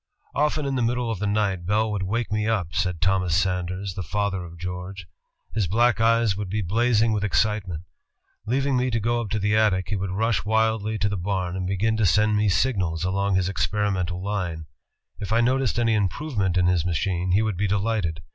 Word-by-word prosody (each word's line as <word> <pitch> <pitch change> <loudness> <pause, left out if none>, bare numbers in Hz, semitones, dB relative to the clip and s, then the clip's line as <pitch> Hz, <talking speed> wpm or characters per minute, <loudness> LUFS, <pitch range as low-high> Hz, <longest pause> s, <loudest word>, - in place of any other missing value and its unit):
"Often 150 0 0
in 140 - -1
the 130 - 0
middle 120 0 0
of 110 - -4
the 105 - -1
night 100 -4 0
Bell 110 +2 +1
would 105 -2 -2
wake 105 +3 -2
me 105 0 0
up," 95 -7 -1
said 90 -1 -1
Thomas 95 -2 +2
Sanders, 95 +1 -1
the 95 - -5
father 95 +2 -2
of 85 0 -10
George. 90 +2 -6 0.5
"His 105 -4 0
black 120 +5 +2
eyes 115 -2 +3
would 100 -1 -4
be 105 +2 -1
blazing 115 +4 +2
with 105 -2 0
excitement. 100 -5 0 0.6
Leaving 135 +3 +1
me 125 0 +1
to 115 -2 0
go 120 +2 0
up 110 - -5
to 110 - -1
the 105 +1 +1
attic, 95 -4 +2
he 105 - -1
would 95 -1 -2
rush 110 +4 0
wildly 110 0 +1
to 105 0 0
the 100 -1 -2
bam 90 -1 -2
and 90 -1 -3
begin 110 +4 0
to 110 -3 +3
send 105 +6 +3
me 105 0 +2
signals 90 -4 0
along 100 +1 0
his 95 -1 +1
experimental 95 -2 -1
line. 90 -6 -3 0.5
If 105 0 -5
I 115 - +3
noticed 130 0 +1
any 115 -1 +2
improvement 100 - 0
in 90 - +3
his 90 -3 +2
machine, 90 +1 -1
he 105 +3 +3
would 110 -3 -1
be 100 +3 0
delighted. 100 -5 -1
100 Hz, 210 wpm, -24 LUFS, 90-110 Hz, 0.6 s, eyes